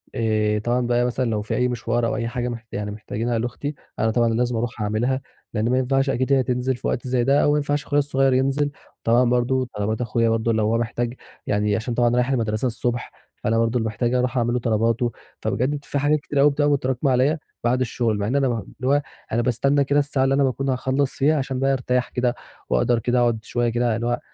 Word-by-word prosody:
آآ، 110 -3 +1
طبعًا 120 +2 0
بقى 120 0 +2
مثلًا 125 0 -1
لو 105 -2 -1
في 105 - -3
أي 125 - +2
مشوار 120 -1 -1
أو - - -1
أي 115 +1 -2
حاجة 120 +1 -3 0.3
يعني 105 0 -3
محت 105 +1 -10
محتاجينها 115 +2 -2
لأختي، 125 +5 -4 0.2
أنا 110 - +2
طبعًا 120 +1 +2
اللي 115 0 0
لازم 125 0 0
أرُوح 115 -1 -3
أعملها، 120 +6 0 0.3
لأن 110 +2 0
ما 125 - +2
ينفعش 135 +1 +1
أكيد 130 +1 +1
هي 130 -1 +4
تنزل 125 +1 0
في - - -5
وقت 125 - -2
زي 125 -1 +1
ده، 140 +3 +3
أو 145 - +4
ما 150 - +3
ينفعش 145 0 -1
أخويا 145 0 +2
الصغير 135 -2 +2
ينزل، 135 +3 +1 0.3
طبعًا 120 +2 +4
برضه 125 +1 +1
طلبات 105 +2 -1
أخويا 115 0 +1
برضه 115 0 +1
لو 110 -1 +1
هو 110 +2 +2
محتاج 120 +1 -2 0.3
يعني 105 0 +1
عشان 115 +2 -2
طبعًا 120 0 +3
رايح 125 +1 +2
المدرسة 115 -3 0
الصبح، 120 0 -2 0.3
فأنا 115 +1 +1
برضه 115 +1 +1
محتاج 115 +2 -1
أرّوح 125 0 0
أعمل 120 0 +1
له 125 - +1
طلباتُه، 115 +1 +1 0.3
فبجد 140 +5 -1
في 140 - -2
حاجات 150 +2 +2
كتيرة 145 -1 -1
أوي 145 +1 +6
بتبقى 145 +1 +1
متراكمة 130 -1 +1
عليَّ 130 +6 +3 0.3
بعد 125 +2 +2
الشغل، 115 -2 0
مع 100 0 -1
إن 125 - -1
أنا 140 -1 +3
اللي 120 +2 -4
هو 145 +1 +3 0.3
أنا 115 - +1
باستنى 135 +4 +2
كده 140 +1 +2
الساعة 140 -2 0
اللي 135 +1 +2
أنا 140 - +3
باكون 135 +1 0
هاخلَّص 130 +1 0
فيها، 150 +3 +2
عشان 130 -1 -2
بقى 135 +1 +2
أرتاح 125 -1 0
كده، 125 -1 0 0.3
وأقدر 115 - +2
كده 120 +2 +1
أقعد 120 -2 +2
شوية 120 -1 0
كده 120 -1 +1
اللي 120 +1 -2
هو 120 0 0
125 Hz, 230 wpm, -23 LUFS, 115-135 Hz, 0.3 s, أوي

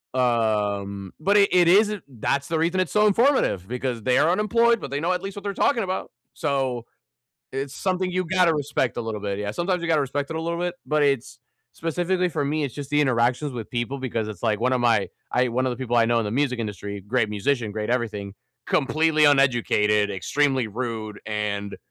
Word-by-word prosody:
Um, 105 -5 0
but 200 +6 +3
it 200 - +5
it 180 -2 +5
isn't 205 +2 +4
That's 140 +2 -2
the 160 - -1
reason 170 +3 +1
it's 185 - 0
so 210 0 +4
informative, 225 - +2
because, 125 -1 -3
they 125 +2 +2
are 160 - +4
unemployed, 230 +4 +3
but 135 - -7
they 140 - -1
know 175 +4 +1
at 180 - -2
least 195 0 -6
what 200 - -7
they're 200 - -2
talking 230 +3 +2
about. 185 0 -4 0.2
So, 130 -4 -1 0.7
it's 135 0 -4
something 185 -1 -1
you 185 0 -1
gotta 180 -1 +3
respect 145 -4 -1
a - - -1
little 110 -2 -4
bit, 100 -1 -3
yeah. 105 0 -2
Sometimes 175 - -1
you 170 - -2
gotta 155 -2 +3
respect 140 +1 -2
it 160 - -3
a - - -2
little 170 +1 -2
bit, 175 0 -2
but 150 0 +1
it's 140 -4 0 0.3
specifically 180 +3 -1
for 155 -4 -2
me, 150 +1 -1
it's 135 - -5
just 145 -1 -7
the 150 0 +3
interactions 125 +1 +1
with 115 -3 -7
people 125 +3 -2
because 115 -4 -3
it's 105 -4 -8
like 110 -2 +1
one 125 +2 +1
of 130 - +1
my 115 -4 +2 0.2
I 125 0 +2
one 130 +2 0
of - - +1
the 120 - -4
people 120 -1 -2
I 115 - +5
know 120 +1 +2
in 115 - 0
the 105 - -3
music 130 +1 0
industry, 100 -2 -5
great 110 +3 0
musician, 105 +2 -1
great 105 +1 -3
everything, 105 -5 -2 0.3
completely 155 +2 +2
uneducated, 120 -7 +3
extremely 130 +6 0
rude, 110 -2 -5
and 100 -1 -3
130 Hz, 215 wpm, -24 LUFS, 110-165 Hz, 0.7 s, it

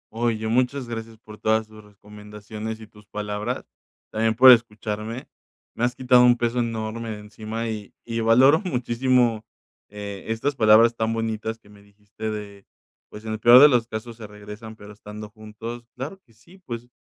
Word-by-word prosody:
Oye, 115 -1 -1
muchas 125 +3 0
gracias 115 -1 -7
por 105 -1 -14
todas 110 0 +1
tus 110 0 -15
recomendaciones 105 +1 -9
y 110 - -10
tus 105 -1 -20
palabras, 105 0 -4 0.5
también 110 0 0
por 130 +3 +9
escucharme, 110 0 0 0.5
me 115 - -4
has 125 0 +1
quitado 125 -1 +5
un 125 0 +5
peso 120 +1 -1
enorme 115 -1 -3
de 110 - -5
encima 110 +2 -6
y 105 -2 -6
y 115 -1 -3
valoro 125 +7 +5
muchísimo, 125 - +1 0.5
eh, 100 -1 -8
estas 115 +6 -1
palabras 115 0 +5
tan 110 0 -1
bonitas 110 0 -3
que 115 - -25
me 105 -1 -17
dijiste 105 +2 -8
de, 100 -2 -7 0.5
pues, 105 +1 -11
en 110 - -4
el 110 - -3
peor 120 +3 +8
de 145 +2 +9
los 120 -4 +2
casos 115 +1 -7
se 110 -2 -9
regresan, 105 +2 -10
pero 105 0 -12
estando 105 0 -10
juntos, 110 +2 -9
claro 150 +10 -7
que 115 - -27
sí, 170 - -20
pues, 120 -8 -7
110 Hz, 175 wpm, -24 LUFS, 105-120 Hz, 0.5 s, por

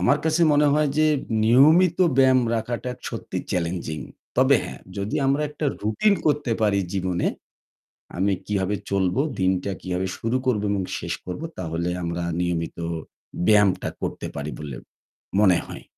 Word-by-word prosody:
আমার 140 +4 +3
কাছে 160 +1 +2
মনে 150 0 +4
হয় 150 0 +3
যে 155 - +5 0.4
নিয়মিত 155 +10 +5 0.2
ব্যায়াম 130 -1 +5
রাখাটা 120 +2 -3 0.2
সত্যিই - - -5
চ্যালেঞ্জিং। 85 -3 -2 0.4
তবে - - +5
হ্যাঁ, - - -8 0.2
যদি 100 +2 -2
আমরা 140 +2 +2
একটা 150 0 -3 0.2
রুটিন 110 - +2
করতে 145 -5 +1
পারি 105 -2 +3
জীবনে 90 -2 -1 0.9
আমি 95 +2 +2
কিভাবে 100 -1 0
চলবো, 95 +4 +1 0.2
দিনটা 95 +1 +1
কিভাবে 90 0 -2
শুরু 115 +3 0
করব 120 -5 +1
এবং 100 -1 0 0.2
শেষ - - -3
করব 90 +10 -5 0.2
তাহলে 85 0 -2
আমরা 85 +1 -2 0.2
নিয়মিত 85 -2 -2 0.7
ব্যায়ামটা 105 -3 +4
করতে - - -4
পারি 70 +1 -4
বলে 75 -4 -6 0.6
মনে 95 -4 +5
হয়। - - -9
100 Hz, 145 wpm, -24 LUFS, 90-130 Hz, 0.9 s, যে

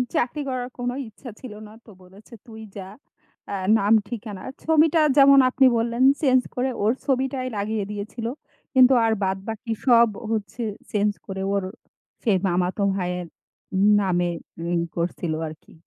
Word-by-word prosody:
চাকরি 255 +5 0
করার 250 -1 -3
কোনো 245 0 -2
ইচ্ছা 240 +3 -11
ছিল 255 -5 -9
না। 210 - -14
তো - - -14
বলেছে 195 +6 -16
তুই 220 -1 -11 0.2
যা। 190 -1 -6 0.6
আ 200 - -3 0.2
নাম 205 +2 +2 0.2
ঠিকানা, 215 -4 -7 0.2
ছবিটা 320 0 +3 0.2
যেমন 275 -1 +7
আপনি 265 +1 +4
বললেন 235 +2 0 0.2
change 260 -4 +3
করে 260 +1 0
ওর 215 +3 +3
ছবিটাই 260 -1 -1
লাগিয়ে 210 +1 -2
দিয়েছিল। 210 +3 -5 0.5
কিন্তু 260 0 +7
আর 225 - +2
বাদবাকি 210 +5 -3
সব 235 -2 +6 0.2
হচ্ছে 220 +1 -3 0.3
change 205 0 0
করে 190 0 -5
ওর 200 - 0 0.6
সেই 210 -6 +2
মামাতো 180 +2 0
ভাইয়ের 180 -1 -3 0.7
নামে 175 -2 +1 0.4
মিল 170 -1 0
করছিল 170 -1 -2 0.2
আরকি। 155 0 -14
220 Hz, 145 wpm, -23 LUFS, 195-255 Hz, 0.7 s, যেমন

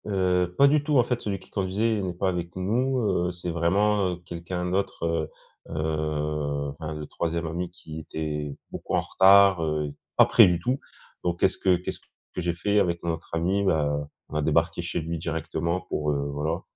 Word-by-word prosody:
Heu, 90 -3 +2
pas 140 - +7
du 145 +1 +3
tout 150 -1 +2
en 125 - +6
fait 120 0 -2
celui 100 -2 -3
qui - - -17
conduisait 105 +3 0
n'est 90 -2 -3
pas 95 +2 0
avec 85 -1 -4
nous, 125 +8 0 0.3
heu, - - -1
c'est 90 0 -5
vraiment, 95 +4 +2
heu, - - -4
quelqu'un 90 +1 -4
d'autre, 95 -2 -1
heu 80 -2 -1 0.4
heu, 75 -2 -2
enfin 80 +2 -6
le 75 0 -5
3e 85 +2 -2
ami 85 +2 -3
qui 80 -3 -9
était 75 -2 -4 0.2
beaucoup - - -3
en - - +3
retard, 95 -2 +6
heu, 75 -2 -1 0.2
pas - - +8
près - - +7
du 90 -1 +1
tout, 125 +9 -1 0.4
donc 85 -1 -1
qu'est-ce 95 - +2
que 95 -2 +4
qu'est-ce 90 +1 -5
que - - -10
j'ai 85 0 0
fait 100 +4 +2
avec 85 -3 0
notre 85 -1 -3
ami? 95 +5 +1
Bah, 75 -5 +1 0.2
on - - -8
a 75 - +1
débarqué 80 +3 +1
chez 85 0 -2
lui 85 +1 -4
directement 85 +1 -2
pour, 75 -4 -2
heu, 70 - 0 0.2
voilà, 80 +5 -2
85 Hz, 195 wpm, -26 LUFS, 80-95 Hz, 0.4 s, pas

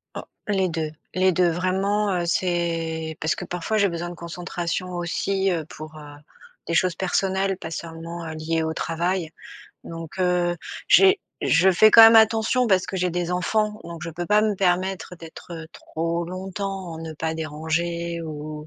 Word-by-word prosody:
Oh. - - -5 0.2
Les 190 -3 +1
2, 160 -2 -3 0.2
les 185 0 +4
2 180 0 +3
vraiment, 190 +4 0
heu, 175 -1 -1
c'est 165 -2 -1
parce 155 - 0
que - - -6
parfois 180 +5 -2
j'ai 200 -2 +3
besoin 170 +1 -4
de - - -7
concentration 175 +1 -4
aussi, 190 +3 0
heu, 165 -3 -2
pour, 155 0 -10
heu, 145 -1 -11 0.5
des 170 - -2
choses 180 +1 +3
personnelles 190 +1 0
pas 165 -3 -7
seulement, 165 +1 -6
heu, 160 - -5
liées 160 +1 -1
au 160 0 -2
travail. 170 +1 -2 0.5
Donc, 165 +1 -8
heu, 180 -1 +1 0.3
j'ai 390 +1 +6 0.2
je 180 +4 +4
fais 215 +4 +6
quand 230 - +9
même 225 0 +9
attention 225 +3 +4
parce 190 -4 +3
que 190 - -4
j'ai 180 -1 0
des 175 0 -2
enfants, 210 +4 0
donc 170 -1 -8
je - - -4
peux 170 +2 -5
pas 210 +4 +4
me 215 -1 +1
permettre 185 0 0
d'être, 165 +1 -11
heu, 160 -1 -7
trop 165 +1 -3
longtemps, 190 0 -5
en - - -8
ne 160 0 -6
pas 160 +1 -3
déranger 165 +2 -2
ou 150 -1 -7
175 Hz, 180 wpm, -24 LUFS, 165-190 Hz, 0.5 s, quand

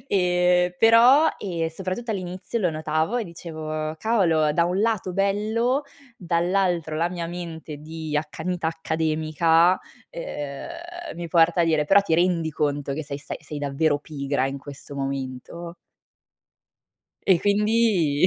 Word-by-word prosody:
Ehm, 180 -1 +3
però, 240 +7 +7
ehm, 170 -4 -2
soprattutto 190 +7 -4
all'inizio 185 +3 -4
lo 180 -5 +1
notavo 155 +7 -1
e 235 - -1
dicevo: 155 -2 -5
"Cavolo, 165 -9 +2
da 170 +2 +3
un 180 +3 0
lato 215 -5 0
bello, 215 +7 +1 0.3
dall'altro, 175 -2 0
la 170 +2 +1
mia 175 -2 -4
mente 165 -3 -7
di 155 0 -6
accanita 160 +3 -3
accademica, 160 +2 +2 0.3
ehm, 340 - -7
mi 175 - -5
porta 170 +1 +4
a - - +3
dire: 155 -2 +2
'Però 200 +4 +6
ti 165 -5 0
rendi 170 -2 +2
conto 145 -2 -1
che 155 +3 -3
sei 140 -1 -5
stai 150 - -7
sei 150 - -7
davvero 145 +1 +1
pigra 140 -3 -2
in 135 +1 -4
questo 140 +1 -10
momento?'" 135 +5 -5 1.5
E 185 -3 +5
quindi 205 -7 +3
170 Hz, 135 wpm, -24 LUFS, 155-195 Hz, 1.5 s, però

